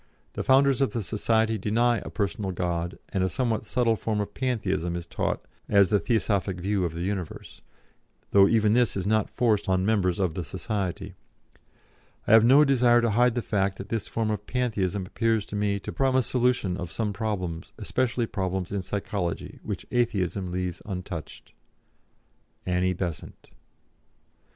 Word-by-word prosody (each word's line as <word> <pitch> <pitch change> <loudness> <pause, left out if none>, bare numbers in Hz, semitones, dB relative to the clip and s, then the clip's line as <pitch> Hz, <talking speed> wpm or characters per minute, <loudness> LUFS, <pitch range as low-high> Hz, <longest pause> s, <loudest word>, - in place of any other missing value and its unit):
The - - -3
founders 135 0 +4
of 135 -6 +1
the 115 - -2
society 110 +1 +1
deny 115 +3 +2
a - - -8
personal 100 0 -2
God, 85 -1 -2
and 95 - 0
a 95 - +1
somewhat 115 -3 -1
subtle 120 -2 +2
form 110 0 -2
of 105 0 -3
Pantheism 95 -9 -1
is 85 -1 -4
taught - - -2 0.2
as 100 -3 +5
the 105 - +3
Theosophic 100 -2 0
view 100 +1 0
of 80 -1 -4
the 85 - -3
universe, 95 -3 -5 0.7
though 100 -1 +7
even 110 -1 +3
this 120 -3 +2
is 95 - -2
not 110 0 +1
forced 110 -5 +1
on 95 0 +2
members 95 -5 +2
of 90 -5 +1
the 90 - -3
society. 95 +1 -4 1.1
I - - 0
have 110 -1 +8
no 135 +6 +7
desire 125 -3 +4
to 115 -1 +1
hide 120 +2 +3
the 120 - -1
fact 100 -2 0
that 100 - -8
this 110 -3 -2
form 110 -1 -1
of 105 0 -4
Pantheism 105 -6 -1
appears 110 +1 0
to - - -7
me 100 -1 0
to - - -6
promise 130 -2 +2
solution 125 -7 +1
of 85 -1 -5
some 105 0 -2
problems, 95 -6 -3
especially 125 -2 0
problems 95 -3 -3
in 100 -1 -1
psychology, 95 -2 -4
which - - -5
Atheism 100 -6 0
leaves 90 -1 -3
untouched. 90 -4 -7 1.1
"ANNIE 90 0 +1
BESANT." 85 -4 -6
105 Hz, 165 wpm, -26 LUFS, 95-115 Hz, 1.1 s, have